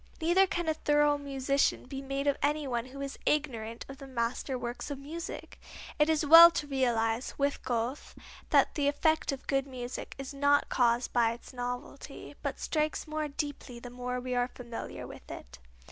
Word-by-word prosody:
Neither 350 +4 +4
can 345 -2 -2
a 315 - +3
thorough 295 -1 +2
musician 275 0 0
be 270 +1 -6
made 275 +1 -3
of 285 -1 +3
any 295 0 +1
one 240 -2 -2
who 275 +2 -9
is 275 -1 -5
ignorant 235 -7 -1
of 275 +1 -10
the 275 - -9
master 255 +1 -2
works 245 +3 -5
of 285 - -4
music. 315 +5 -7 0.4
It 300 +1 +4
is 315 -1 +2
well 330 +3 +11
to 335 - -3
realize, 240 -4 0
with 280 0 0
Goethe, 240 +3 -3 0.3
that - - +4
the 290 -3 0
effect 315 +2 +2
of 275 - -6
good 270 0 0
music 250 -2 -6
is 275 0 -6
not 285 +1 +3
caused 240 -1 +2
by 230 -2 +3
its 235 - -12
novelty, 245 0 -6
but - - -3
strikes 305 -1 -1
more 310 -1 -2
deeply 285 -3 -5
the 245 0 -9
more 250 0 -3
we 250 0 -4
are 245 0 +1
familiar 240 -2 -7
with - - -12
it. - - -9
275 Hz, 185 wpm, -30 LUFS, 245-295 Hz, 0.4 s, well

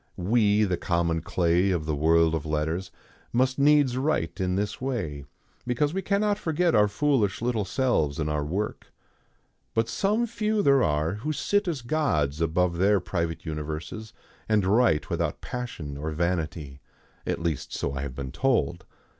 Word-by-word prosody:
We, 105 +2 +3
the 90 -4 0
common 85 -2 0
clay 85 +3 +1
of 85 -5 0
the 80 - -1
world 80 +2 +3
of 80 -3 -1
letters, 80 +4 -2 0.4
must 130 +2 +1
needs 145 -3 +4
write 130 - -1
in 90 0 0
this 100 +2 -2
way, 90 - -3 0.4
because 145 +5 +1
we 195 - -1
cannot 205 +1 +1
forget 170 -1 +1
our 105 -1 +5
foolish 110 -4 +1
little 115 -3 -1
selves 95 - 0
in 75 - -1
our 75 -1 -1
work. 95 +8 -4 0.8
But 115 0 +2
some 210 - +1
few 215 -2 -1
there 140 -1 +5
are 75 0 +1
who 155 - -1
sit 205 +6 0
as 150 -8 -2
gods 80 - 0
above 85 +1 +1
their 100 +2 +4
private 85 -2 -3
universes, 80 +7 -5 0.4
and 105 -3 +3
write 105 -5 +2
without - - -1
passion 90 -13 -6
or 75 +2 -3
vanity. 80 -4 -2 0.5
At - - -1
least, 80 -4 -3
so 70 - -2
I 70 - -3
have 70 -3 -5
been 65 -1 -5
told. 95 - 0
95 Hz, 165 wpm, -26 LUFS, 80-130 Hz, 0.8 s, our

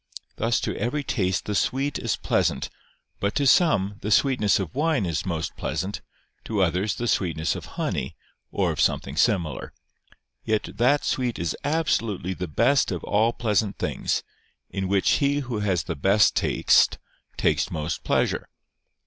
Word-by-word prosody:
Thus 115 0 +1
to - - -2
every 130 +7 -1
taste 95 -8 -1
the 105 - -2
sweet 135 +7 0
is 115 - -1
pleasant - - 0 0.5
but 100 +1 -1
to 140 - +1
some, 105 - +3
the 105 - -3
sweetness 110 -3 +3
of 95 -5 -4
wine 150 -6 +1
is 85 +1 -2
most 80 -3 -3
pleasant, 95 +2 -3 0.4
to 105 -3 +1
others, 95 +4 0
the 120 - -3
sweetness 80 -6 0
of - - -7
honey, - - -2 0.4
or - - +1
of - - -2
something 70 - 0
similar. 85 -3 0 0.7
Yet 110 -1 0
that 135 +5 +3
sweet 125 -3 -1
is 85 -2 -2
absolutely 115 - 0
the 90 0 -5
best 120 - +2
of 90 - -4
all 110 +3 +2
pleasant 110 -3 0
things, - - -1 0.5
in 95 -1 -2
which 100 0 +1
he 140 +1 +2
who 125 -5 -4
has 95 -5 0
the 85 - -4
best 95 +8 +3
taste - - +3 0.4
takes - - +1
most 75 +1 -3
pleasure. - - 0
105 Hz, 155 wpm, -25 LUFS, 95-125 Hz, 0.7 s, some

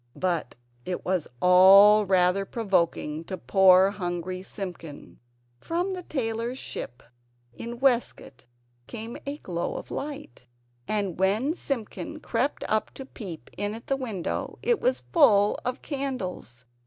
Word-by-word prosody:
But 175 -8 -2 0.3
it 180 +5 -5
was 180 -4 0 0.2
all 195 +3 +7
rather 185 +1 +3
provoking 170 -7 -1
to 185 - -5
poor 190 +1 +5
hungry 185 -1 -4
Simpkin. 180 -6 -8 0.4
From 350 - -2
the 365 - -5
tailor's 235 -5 -3
ship 120 - -7 0.5
in 235 - -7
Westgate 240 - 0 0.4
came 230 0 -7
a 285 +1 -3
glow 175 - -4
of - - -7
light; 290 - -7 0.4
and 200 -5 -2
when 210 +10 +2
Simpkin 275 - -5
crept 250 +1 -1
up 215 0 0
to 270 - -8
peep 180 - -9
in 205 +1 -2
at 230 - -10
the 275 - 0
window 225 -10 -4
it 475 -1 +1
was - - +1
full 210 - +5
of 250 +2 -4
candles. 230 - -5
205 Hz, 130 wpm, -26 LUFS, 180-260 Hz, 0.5 s, all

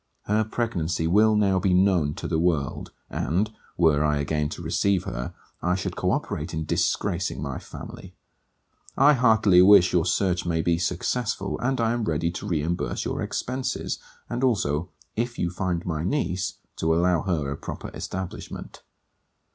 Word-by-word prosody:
Her 105 +2 +2
pregnancy 90 -8 -1
will 105 +6 +4
now 100 -3 +3
be 90 0 +2
known 90 -6 +3
to - - -5
the 80 - 0
world; 80 -5 0 0.2
and, 95 +9 0 0.3
were 80 -4 +4
I 75 -1 +2
again 75 +1 -1
to - - -7
receive 100 -3 +1
her, - - -5 0.3
I 90 +1 +1
should 95 - -3
co - - 0
operate - - -2
in 80 0 -2
disgracing 90 +1 0
my 70 -3 -4
family. - - -10 0.8
I 145 +3 +7
heartily 110 -8 +5
wish 95 -1 +7
your 85 -3 +3
search 90 -3 +1
may 80 -2 0
be 85 -1 +2
successful; 95 +4 -1
and 130 +1 0
I 115 -1 +2
am 120 -2 -1
ready 85 0 0
to 90 - -6
reimburse 85 -1 -1
your - - -2
expences; 130 +1 -3 0.3
and 120 +2 -3
also, 85 - +1 0.3
if 120 +2 -2
you 85 - -1
find 90 -2 -2
my 80 -3 -2
niece, 95 - -1 0.2
to 80 0 +2
allow 85 -1 +3
her 75 -7 -1
a - - -2
proper - - -7
establishment. 95 -1 -6
90 Hz, 165 wpm, -25 LUFS, 80-105 Hz, 0.8 s, I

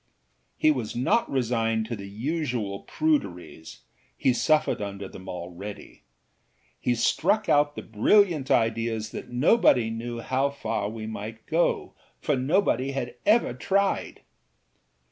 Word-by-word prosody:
â - - -45 0.5
He 155 - +4
was 125 -7 -3
not 130 - +1
resigned 115 -3 0
to 115 +1 -4
the 100 -2 -8
usual 120 -4 -3
pruderiesâhe 130 - -2
suffered 155 -1 +2
under 100 -1 -5
them 95 0 -11
already. 90 +3 -8 0.8
He 125 - +1
struck 200 - +1
out 145 -2 +3
the - - -6
brilliant 150 - +3
idea 115 0 +1
that 110 0 -7
nobody 125 - +3
knew 115 +1 -5
how 130 +4 0
far 105 -7 -3
we 110 0 -6
might 110 +1 -7
go, 165 +2 0 0.3
for 150 - 0
nobody 135 -1 +1
had 125 -3 -3
ever 225 +3 +4
tried. 200 0 0
120 Hz, 125 wpm, -26 LUFS, 110-150 Hz, 0.8 s, He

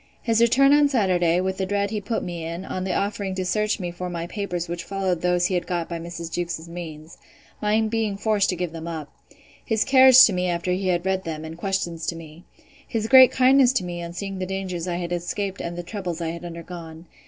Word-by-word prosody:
His 230 -1 +2
return 275 +4 +5
on 290 -1 +5
Saturday, 180 - +2
with 190 0 -2
the 190 - -1
dread 200 +1 -1
he 215 -2 -2
put 220 +3 -2
me 175 -2 -5
in, 170 +3 -5
on 185 -1 -4
the 185 - -1
offering 200 -1 -2
to 185 -1 -2
search 215 +4 0
me 175 -2 -4
for 180 +1 -5
my 170 -1 -4
papers 180 -2 -4
which 170 0 -5
followed 190 -3 -2
those 180 0 +2
he 185 - 0
had 180 - -1
got 175 -2 -2
by 170 -1 -5
Mrs. 170 0 -7
Jewkes's 170 -1 -3
means. 165 -2 -9 0.4
My 210 +1 +2
being 220 -2 -1
forced 205 -1 +1
to 180 - 0
give 175 -1 -3
them 165 0 -7
up. 160 -3 -6 0.5
His 220 -2 +1
carriage 265 0 +8
to 210 - +1
me 180 0 0
after 175 +1 -1
he 185 +1 -1
had 175 -1 0
read 190 0 0
them, 160 -1 -5
and 160 0 -7
questions 170 -2 -3
to 170 - -1
me. 165 +2 -12 0.4
His 220 -1 -2
great 260 +1 +9
kindness 260 0 +5
to 255 - 0
me 175 -1 -5
on 170 0 -7
seeing 195 +1 -5
the 185 - -3
dangers 185 -2 -4
I 175 - -1
had 175 0 -4
escaped 190 +3 -3
and 170 0 -5
the 175 - -4
troubles 180 -3 -5
I 165 -1 -2
had 170 +1 -6
undergone. 170 -1 -9
180 Hz, 235 wpm, -24 LUFS, 170-205 Hz, 0.5 s, great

